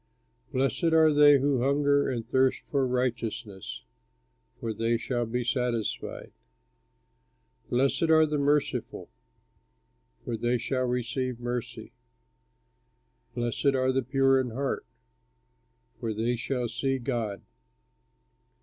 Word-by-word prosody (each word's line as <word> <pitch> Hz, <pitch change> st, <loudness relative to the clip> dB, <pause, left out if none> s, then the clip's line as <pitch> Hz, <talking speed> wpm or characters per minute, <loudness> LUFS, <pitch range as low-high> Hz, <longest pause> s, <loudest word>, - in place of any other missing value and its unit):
Blessed 135 Hz, +5 st, +1 dB
are 160 Hz, -1 st, +5 dB
they 145 Hz, -1 st, +7 dB
who 135 Hz, -2 st, +1 dB
hunger 140 Hz, +1 st, +2 dB
and 115 Hz, -3 st, -3 dB
thirst 130 Hz, +1 st, +2 dB
for 135 Hz, -3 st, +2 dB
righteousness, 115 Hz, -5 st, -3 dB, 0.8 s
For 115 Hz, -1 st, -3 dB
they 115 Hz, +1 st, 0 dB
shall 120 Hz, 0 st, -2 dB
be 125 Hz, +2 st, -2 dB
satisfied. 120 Hz, -3 st, -2 dB, 1.4 s
Blessed 135 Hz, +6 st, +1 dB
are 160 Hz, 0 st, +6 dB
the 150 Hz, -1 st, -1 dB
merciful, 145 Hz, +1 st, 0 dB, 1.2 s
For 120 Hz, -, -2 dB
they 120 Hz, +2 st, +1 dB
shall 130 Hz, +2 st, -1 dB
receive 125 Hz, 0 st, -2 dB
mercy. 120 Hz, 0 st, -5 dB, 1.4 s
Blessed 120 Hz, +3 st, 0 dB
are 130 Hz, 0 st, +2 dB
the 135 Hz, +1 st, +1 dB
pure 135 Hz, +1 st, +3 dB
in 125 Hz, -, -3 dB
heart, 130 Hz, -, -3 dB, 1.1 s
For 110 Hz, -2 st, -3 dB
they 115 Hz, +3 st, 0 dB
shall 125 Hz, +1 st, -2 dB
see 130 Hz, +4 st, -1 dB
God. 115 Hz, -6 st, -3 dB
125 Hz, 110 wpm, -28 LUFS, 120-135 Hz, 1.4 s, they